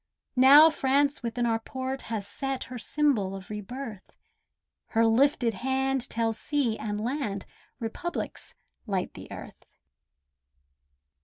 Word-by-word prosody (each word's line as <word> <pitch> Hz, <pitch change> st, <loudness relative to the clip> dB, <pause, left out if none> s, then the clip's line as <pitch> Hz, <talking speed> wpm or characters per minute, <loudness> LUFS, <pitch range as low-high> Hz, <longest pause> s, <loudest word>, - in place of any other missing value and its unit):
Now 285 Hz, +5 st, +9 dB
France 280 Hz, 0 st, +2 dB
within 240 Hz, 0 st, -1 dB
our 225 Hz, -1 st, +1 dB
port 260 Hz, +3 st, -4 dB
has 215 Hz, -3 st, -2 dB
set 270 Hz, +4 st, -3 dB
Her 250 Hz, -1 st, -8 dB
symbol 230 Hz, -10 st, +1 dB
of 195 Hz, +1 st, -9 dB
re 210 Hz, 0 st, -4 dB
birth; 225 Hz, -2 st, -8 dB, 0.7 s
Her 225 Hz, 0 st, +2 dB
lifted 240 Hz, 0 st, +3 dB
hand 265 Hz, +3 st, -1 dB
tells 225 Hz, -1 st, -1 dB
sea 280 Hz, -7 st, 0 dB
and 210 Hz, -1 st, -3 dB
land 220 Hz, -4 st, -2 dB, 0.3 s
Republics 270 Hz, +10 st, -5 dB, 0.3 s
light 190 Hz, -3 st, -1 dB
the -, -, -11 dB
earth. -, -, -11 dB
245 Hz, 125 wpm, -28 LUFS, 220-270 Hz, 0.7 s, Now